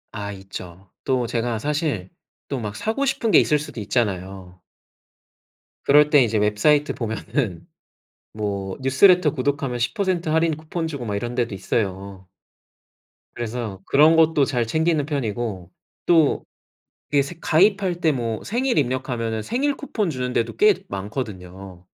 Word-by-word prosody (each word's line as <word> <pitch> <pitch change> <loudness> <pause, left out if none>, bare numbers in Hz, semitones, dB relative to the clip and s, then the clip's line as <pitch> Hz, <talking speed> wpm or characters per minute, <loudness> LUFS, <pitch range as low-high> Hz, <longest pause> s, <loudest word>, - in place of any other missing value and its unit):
아 100 -1 -4
있죠. 95 -1 -10
또 130 -2 0
제가 115 0 -1
사실 145 - -2 0.4
또 140 - -3
막 105 -3 -5
사고 225 - -2
싶은 265 -5 0
게 - - +8
있을 150 - +3
수도 150 -5 -7
있잖아요. 95 -4 -3 1.2
그럴 150 +1 +5
때 145 -3 +6
이제 115 -2 0
웹사이트 105 +9 +2
보면은 110 - -3 0.7
뭐 100 -3 -4
뉴스레터 155 +5 +5
구독하면 135 -2 -2
10% 175 - -1
할인 160 0 +2
쿠폰 160 +1 -4
주고 140 -6 -5
막 105 -2 -2
이런 120 +4 -4
데도 120 -4 -1
있어요. 95 -1 -3 1.1
그래서 115 -4 -5
그런 155 +4 +5
것도 160 -3 +4
잘 125 -3 0
챙기는 160 +2 +1
편이고 115 - -3 0.3
또 160 -4 +3 0.7
이게 140 -1 +4
새 140 +5 -8
가입할 185 +1 +2
때 160 -3 +3
뭐 115 -4 -3
생일 245 +1 0
입력하면은 120 -4 -1
생일 280 - 0
쿠폰 215 - -2
주는 125 -3 -3
데도 115 -1 -1
꽤 210 -1 +5
많거든요. 95 -4 -7
125 Hz, 275 characters per minute, -22 LUFS, 105-155 Hz, 1.2 s, 게